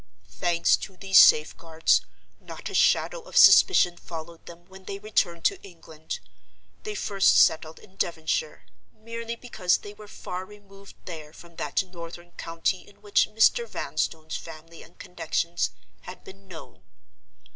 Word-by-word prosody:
"Thanks 170 -1 +1
to 190 - -10
these 190 -1 +5
safeguards, 160 +1 +4 0.4
not - - -9
a - - -10
shadow - - +2
of - - -7
suspicion 175 - +6
followed 165 0 -10
them 170 0 -13
when 190 +1 -15
they 195 - -6
returned 195 -5 -1
to - - +1
England. 165 -4 -9 0.6
They 425 -1 -6
first 200 - +2
settled 160 0 +3
in 190 0 -19
Devonshire, 170 - -2 0.3
merely 230 +1 -7
because 220 -7 0
they 205 - -11
were 210 0 -14
far 180 -2 -7
removed 200 0 -16
there 155 -4 -9
from 170 0 -16
that - - -1
northern 175 -1 -11
county 165 +3 -3
in 205 - -21
which 205 -1 +2
Mr. 225 - +3
Vanstone's 160 - -4
family 165 +1 -12
and 170 - -17
connections 170 0 -2 0.3
had 180 - -11
been 195 0 -15
known. 170 -4 -12
180 Hz, 145 wpm, -26 LUFS, 165-200 Hz, 0.6 s, suspicion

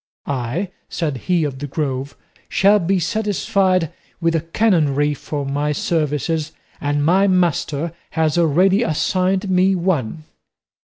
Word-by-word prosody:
"I," 140 - -3 0.2
said 150 -6 -2
he 175 -3 +3
of 140 -3 -3
the 145 - -4
Grove, 140 -1 -3 0.3
"shall 205 +2 +4
be 190 +2 +1
satisfied 190 -3 0 0.3
with 165 -1 +1
a - - +3
canonry 155 -6 +1
for 145 0 -5
my 145 +2 -1
services, 155 0 -1 0.3
and 145 0 0
my 190 +5 +4
master 170 -4 0 0.2
has 160 -2 +2
already 175 +5 +3
assigned 185 +2 0
me 185 +1 +3
one." 160 -6 -1
165 Hz, 125 wpm, -20 LUFS, 145-185 Hz, 0.3 s, shall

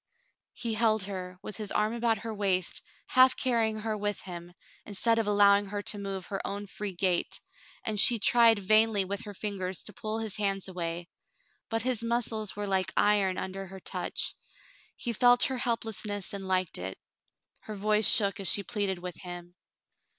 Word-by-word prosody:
He 235 -2 -3
held 220 -2 +2
her, 185 -2 -6
with 210 - -7
his 210 -2 -3
arm 215 +1 +1
about 235 -1 +1
her 225 +2 -6
waist, 190 -3 0 0.3
half 255 0 +6
carrying 225 -4 +1
her 220 0 -2
with 205 0 -2
him, 175 -1 -8 0.3
instead 225 +3 +1
of 220 - -1
allowing 205 0 +5
her 205 +1 -4
to 205 - 0
move 195 -2 -4
her 195 -1 -4
own 200 +1 -4
free 205 0 -5
gait, 180 -1 0 0.4
and 215 -2 -1
she 235 +3 +7
tried 230 +1 +5
vainly 215 0 +3
with 200 +1 -3
her 205 - -7
fingers 190 -3 -3
to 210 - -6
pull 215 +3 -4
his 220 -2 -2
hands 195 -2 0
away; 170 -2 -4 0.6
but 225 -1 -1
his 250 -3 0
muscles 230 -3 -1
were 205 0 -3
like 190 -1 0
iron 200 -3 +3
under 190 +1 -5
her 190 +1 -10
touch. - - -3 0.6
He 240 - -3
felt 245 +1 +5
her 265 - +2
helplessness 220 -5 -2
and 195 -1 -5
liked 185 - 0
it. 95 +1 -5 0.6
Her 215 - -8
voice 210 +1 +2
shook 200 -2 +3
as 195 - -2
she 200 - +3
pleaded 200 -4 -2
with 180 -1 -7
him. 175 -1 -8
205 Hz, 180 wpm, -29 LUFS, 190-220 Hz, 0.6 s, she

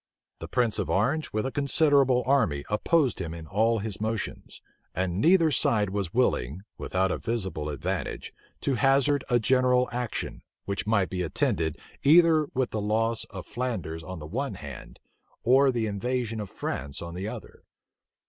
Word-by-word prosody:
The - - -6
prince 120 -4 0
of - - -2
Orange 140 +11 +1
with 110 0 -1
a 135 - -2
considerable 140 -3 +3
army 115 - +2
opposed 130 +4 +2
him 85 -3 -4
in 80 -1 -8
all 110 +7 +2
his 105 -1 -5
motions; 110 0 -4 0.4
and 95 +1 -1
neither 165 0 +5
side 105 -6 +2
was 100 -4 -2
willing, 90 - 0
without 95 0 -1
a - - -2
visible 95 -10 -3
advantage, 70 - -4 0.3
to 140 - 0
hazard 135 +2 +3
a 120 - +4
general 125 +1 +3
action, 120 -1 -4 0.2
which 100 +1 -3
might 100 -4 +2
be 90 -1 -2
attended 80 -2 0 0.2
either 160 0 +5
with 130 -1 0
the 110 - -2
entire 105 - -3
loss 115 +1 +1
of - - -9
Flanders 105 -10 -4
on 95 +3 -7
the 75 - -8
one 125 - -3
hand, 70 -6 -9 0.5
or 135 +3 +5
the 120 -3 -1
invasion 115 +2 -2
of 105 -2 -5
France 70 -3 -5
on 85 0 -7
the 95 +3 -4
other. - - -9
110 Hz, 165 wpm, -27 LUFS, 95-130 Hz, 0.5 s, neither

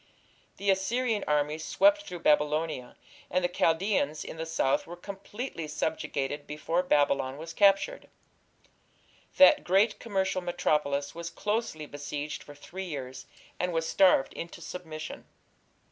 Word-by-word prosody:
The 200 0 +2
Assyrian 215 +3 0
armies 150 +1 0
swept 300 - +3
through 175 -2 -7
Babylonia, 150 -3 +1 0.3
and 185 +1 +1
the - - +3
Chaldeans 165 -3 +1
in - - -7
the 160 0 -4
south 140 -4 +1
were 175 - -7
completely 200 0 -6
subjugated 145 -2 -2
before 160 +4 -1
Babylon 140 -5 +2
was 165 +2 -7
captured. 200 - +3 1.3
That 285 +1 +7
great 200 +4 +3
commercial 190 -4 -1
metropolis 150 -5 0
was 170 0 -5
closely 205 -4 -2
besieged 145 +1 -5
for 145 - -12
three 185 +6 -7
years, 130 -6 -6 0.3
and 180 0 0
was 165 0 0
starved 185 -8 +4
into 170 0 -7
submission. 160 -2 -7
165 Hz, 130 wpm, -29 LUFS, 150-190 Hz, 1.3 s, That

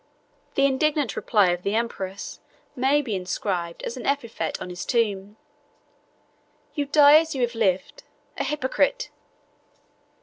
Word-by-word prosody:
The 275 - +4
indignant 275 -3 +1
reply 205 -5 +3
of 175 0 -2
the 200 +3 -1
empress 200 -4 -4 0.4
may 275 +3 +2
be 225 -6 -3
inscribed 180 -2 -3
as 235 - -4
an 250 - -6
epitaph 275 -5 -2
on 180 - -6
his 180 0 -5
tomb, 210 -4 -1 1.4
"You 290 -3 -2
die, 295 +1 +7
as 320 -2 -3
you 260 - -2
have 240 0 0
lived—A 220 - -3
Hypocrite!" 300 - 0
235 Hz, 130 wpm, -24 LUFS, 195-285 Hz, 1.4 s, die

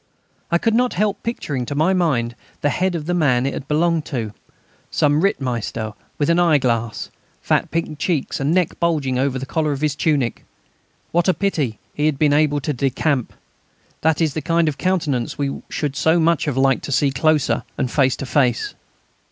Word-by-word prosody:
And 170 - +1
I - - +6
could 225 +5 +1
not 245 +2 +2
help 205 +1 0
picturing 145 - -3
to 145 - -3
my 160 +6 +3
mind 135 -10 +1 0.3
the 145 - +2
head 185 0 0
of 155 -3 -4
the 175 - -1
man 130 -7 +2
it 140 - -1
had 135 - -6
belonged 165 +1 +2
to, 115 -6 -4 0.6
some 150 +1 +2
Rittmeister, 120 - -1 0.2
with 145 - +1
an 170 +1 +3
eyeglass, 125 -9 +1 0.3
fat - - +1
pink 160 -2 -3
cheeks 165 -7 -1
and 140 +2 0
neck 180 -1 +1
bulging 145 -7 +1
over 135 0 0
the 130 - -4
collar 155 +1 0
of 140 - -5
his 150 -2 +1
tunic. 145 -6 0 0.7
What 175 +2 +2
a 185 - +3
pity 150 - -1 0.2
he 150 +1 +1
had 150 -3 0
been 145 0 +3
able 145 -1 +3
to 150 - -1
decamp! 135 0 0 0.7
That 160 +1 +2
is 155 -3 +2
the 155 - -3
kind 165 0 +2
of 150 -2 -2
countenance 160 -10 0
we 140 -1 -2
should 145 -3 -2
so 160 +4 +3
much 165 0 +2
have 145 -4 -2
liked 135 -1 +3
to - - -5
see 140 +1 +2
closer 150 +2 +2 0.2
and 125 - -1
face 130 -3 +3
to - - -6
face. 125 -2 +1
150 Hz, 195 wpm, -21 LUFS, 135-165 Hz, 0.7 s, I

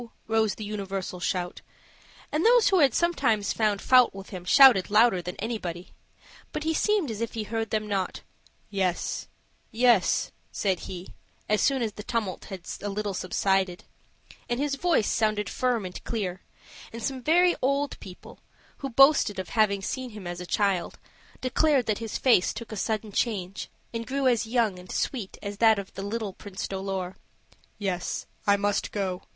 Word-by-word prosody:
rose 220 -2 +2
the 215 - -7
universal 195 -3 -4
shout 180 0 -2 0.7
and 305 +3 0
those 475 -1 +6
who 380 -2 +4
had 280 -4 +5
sometimes 245 -9 +1
found 210 -3 +1
fault 250 -3 +5
with 195 0 -9
him 185 -3 -6
shouted 245 -4 +7
louder 210 -3 +4
than 180 +1 -6
anybody. 195 -5 -4 0.6
But - - -3
he 320 +1 +1
seemed 400 - +1
as 215 - -5
if 230 -1 -3
he 225 - -3
heard 225 +1 -3
them 215 -1 -1
not. 195 -3 -2 0.5
"Yes, 185 -3 -1 0.4
yes," 235 -3 +3 0.2
said 190 -3 0
he, 180 0 -8 0.3
as 215 0 +2
soon 270 -3 +2
as 220 - -1
the 210 - -9
tumult 215 -5 -3
had 190 -2 -7 0.2
a 205 - -3
little 205 0 -2
subsided: 190 0 0 0.7
and 240 +1 -1
his 285 0 0
voice 315 -5 +2
sounded 215 -2 +1
firm 245 -5 0
and 180 - -7
clear; 190 -5 -3 0.5
and 230 0 -7
some 265 0 -2
very 350 +6 +4
old 280 +2 0
people, 180 -1 -12 0.4
who 275 - -5
boasted 270 -5 +5
of 185 -1 -4
having 205 -4 +2
seen 260 +4 -3
him 210 -3 -9
as 175 0 -5
a 180 - -7
child, 195 -3 0 0.4
declared 265 0 +2
that 215 -2 0
his 225 -2 -4
face 235 -8 +3
took 230 - -7
a - - -4
sudden 215 +1 -2
change, 195 -4 -2 0.2
and 230 0 -4
grew 275 +1 -1
as 240 -3 +2
young 225 -5 +1
and 180 0 -11
sweet 230 -8 -3
as 200 0 -5
that 220 0 +5
of 200 -1 -6
the - - -6
little 205 0 -3
Prince 195 -1 -6
Dolor. 190 -1 -4 0.6
"Yes, 185 -3 -3 0.2
I 200 0 +5
must 205 0 0
go. 190 -3 -2
215 Hz, 175 wpm, -27 LUFS, 195-245 Hz, 0.7 s, shouted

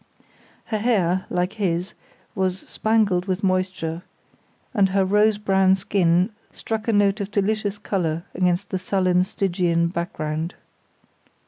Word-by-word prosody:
Her 215 - -2
hair, 190 -5 +1
like 180 +2 -1
his, 180 0 -1 0.4
was 190 -1 -1
spangled 215 -5 +1
with 185 +1 -2
moisture, 185 -3 -1 0.7
and 195 -2 +3
her 195 0 +2
rose 210 +2 +3
brown 190 -2 +3
skin 185 0 +2 0.2
struck 220 0 -4
a - - +3
note 205 0 +3
of 200 - -3
delicious 205 0 0
colour 170 -6 -2
against 180 +1 0
the 190 - -1
sullen 185 -1 +2
Stygian 175 -3 0
background. 165 -2 -3
190 Hz, 125 wpm, -23 LUFS, 180-205 Hz, 0.7 s, and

